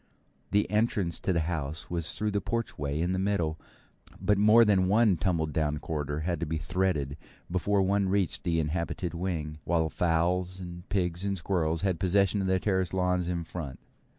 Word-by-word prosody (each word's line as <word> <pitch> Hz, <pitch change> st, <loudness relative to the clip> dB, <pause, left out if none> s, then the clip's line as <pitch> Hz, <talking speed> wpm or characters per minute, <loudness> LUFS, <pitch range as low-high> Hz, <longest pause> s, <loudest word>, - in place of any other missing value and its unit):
The 105 Hz, 0 st, +2 dB
entrance 105 Hz, -5 st, +1 dB
to -, -, -1 dB
the 85 Hz, -2 st, +2 dB
house 80 Hz, 0 st, -3 dB
was 85 Hz, -2 st, -1 dB
through 105 Hz, 0 st, -1 dB
the 100 Hz, 0 st, 0 dB
porchway 75 Hz, -11 st, -2 dB
in 90 Hz, +2 st, 0 dB
the 95 Hz, -, 0 dB
middle, 90 Hz, -5 st, 0 dB, 0.6 s
but 105 Hz, -1 st, +2 dB
more 110 Hz, +3 st, +7 dB
than 95 Hz, -3 st, +3 dB
one 105 Hz, 0 st, +4 dB
tumble 85 Hz, -2 st, +1 dB
down 75 Hz, -1 st, -1 dB
corridor 75 Hz, -1 st, -3 dB
had 85 Hz, 0 st, -1 dB
to 85 Hz, -, -2 dB
be 80 Hz, +1 st, -1 dB
threaded 80 Hz, -4 st, -1 dB, 0.3 s
before 95 Hz, +2 st, +2 dB
one 100 Hz, 0 st, +1 dB
reached 95 Hz, -2 st, 0 dB
the 85 Hz, -2 st, +1 dB
inhabited 85 Hz, +2 st, -2 dB
wing; 85 Hz, -4 st, -3 dB
while 80 Hz, -2 st, +1 dB
fowls 90 Hz, +3 st, 0 dB
and 85 Hz, 0 st, -9 dB
pigs 90 Hz, -2 st, -1 dB
and 100 Hz, -1 st, -1 dB
squirrels 85 Hz, -3 st, 0 dB
had 95 Hz, -4 st, 0 dB
possession 100 Hz, +1 st, +2 dB
of 95 Hz, -, -1 dB
the 95 Hz, 0 st, +2 dB
terrace 95 Hz, -2 st, 0 dB
lawns 90 Hz, -1 st, +1 dB
in 85 Hz, -1 st, -2 dB
front. 80 Hz, -5 st, -7 dB
90 Hz, 180 wpm, -29 LUFS, 80-95 Hz, 0.6 s, more